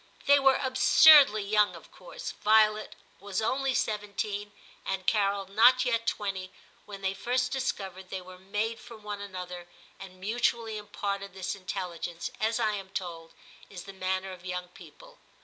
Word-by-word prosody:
They 285 0 +6
were 270 -1 +5
absurdly 260 -2 +6
young 210 +1 +2
of - - -14
course. - - -8
Violet 215 0 +2 0.2
was 200 -2 -3
only 260 +4 0
seventeen 205 -1 -2 0.3
and 195 -1 -3
Carol 200 -2 +1
not 235 +6 +5
yet 230 -2 0
twenty 195 -4 -3 0.4
when 200 -1 -9
they 190 0 0
first 250 +5 -1
discovered 190 -8 -4
they 190 - -4
were 185 0 -13
made 210 +4 -3
for 230 - -12
one 210 -1 -7
another, 180 -3 -7 0.3
and 185 -1 -11
mutually 225 +2 -1
imparted 200 -2 -5
this 190 -1 -3
intelligence, 180 -3 -5
as, 225 +2 0
I 220 -2 +2
am 195 -2 -6
told, 170 -4 -6 0.4
is 180 -3 -9
the 195 - -10
manner 190 0 -2
of 180 -1 -11
young 180 -1 -5
people. - - -16
200 Hz, 155 wpm, -28 LUFS, 190-225 Hz, 0.4 s, They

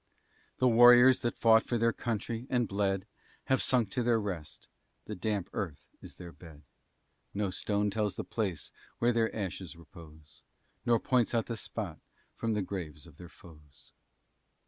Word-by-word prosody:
The 130 - +3
warriors 120 +2 +7
that 120 - -3
fought 115 -1 +5
for 120 - -1
their 115 0 +2
country, 115 +1 -4
and 120 -2 +1
bled, 95 -1 -1 0.4
Have 130 - +1
sunk 120 -6 +1
to 125 - -1
their 120 -1 +2
rest; 90 -7 -6 0.4
the 105 - -6
damp 100 -1 -2
earth 85 -9 -5 0.2
is - - -11
their 90 -2 -10
bed; 80 -4 -15 0.7
No 100 -2 -1
stone 105 +2 -1
tells 105 -1 -1
the - - -4
place 95 -9 -3 0.3
where 120 +1 +2
their 115 -1 0
ashes 95 -4 -5
repose, 80 -2 -15 0.5
Nor 120 -1 +4
points 125 -2 +1
out 115 - +1
the 115 - -4
spot 110 - -5 0.4
from 115 -1 -2
the 105 -2 -1
graves 85 -6 -6
of 80 -3 -16
their 90 -1 -11
foes. 75 -7 -17
105 Hz, 165 wpm, -30 LUFS, 85-115 Hz, 0.7 s, warriors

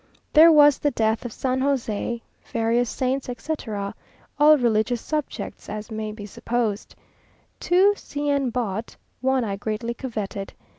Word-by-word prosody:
There 325 +2 +9
was 295 -2 +6
the 295 - +2
death 220 -2 0
of 245 - -4
San 260 +3 -1
José, 240 -4 -1 0.3
various 230 +1 +1
saints, 260 +4 -2
etc., 225 -6 -4 0.5
all 305 +1 +7
religious 235 -1 +1
subjects, 300 +3 -5
as 215 +2 -6
may 215 0 -4
be 210 -1 -8
supposed. 220 0 -3 0.6
Two 375 +4 +4
C 290 -6 -5
n 280 -2 +1
bought; 225 -2 -3 0.2
one 265 0 +1
I 200 -3 -3
greatly 220 +3 -3
coveted. 210 -5 -5
240 Hz, 140 wpm, -24 LUFS, 220-275 Hz, 0.6 s, There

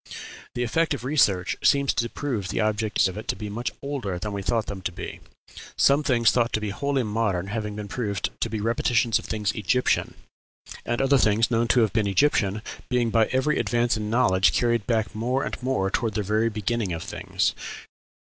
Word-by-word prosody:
The 120 - 0
effect 160 +6 +1
of 120 - -9
research 105 -10 +2
seems 140 -1 +3
to 120 - 0
be - - -2
to - - -19
prove 120 -10 -2
the 105 - -2
objects 110 -1 +1
of 95 +2 -5
it - - -10
to - - 0
be 105 -1 -6
much 120 +4 -2
older 130 -10 -3
than 105 +3 -4
we 100 - -3
thought 115 +2 0
them 100 -2 -6
to 95 - -3
be - - -7 0.6
some 140 +2 +4
things 120 -5 +3
thought 120 -1 +1
to - - +1
be 105 -1 -3
wholly 140 +4 -1
modern 105 -4 -1
having 105 -1 -3
been 105 -1 -6
proved 100 -3 -2
to 115 - -1
be 110 -1 -3
repetitions 115 +1 +1
of - - -11
things 105 -2 -1
Egyptian, 110 +5 0 0.7
and 120 +3 0
other 135 0 +4
things 110 +2 +3
known 115 0 +2
to 125 - +4
have 110 - +1
been 110 -3 +1
Egyptian 105 -1 +2 0.3
being 120 -2 +1
by 110 -1 +3
every 130 +3 +1
advance 120 -1 +1
in 105 -1 -3
knowledge 95 -5 +3
carried 120 -3 +1
back 110 -3 0
more 125 +5 -1
and - - -5
more 125 -7 0
toward 110 -2 -1
the 105 - 0
very 110 +3 +1
beginning 105 -2 -2
of 80 - -5
things. - - -1
110 Hz, 210 wpm, -25 LUFS, 105-125 Hz, 0.7 s, some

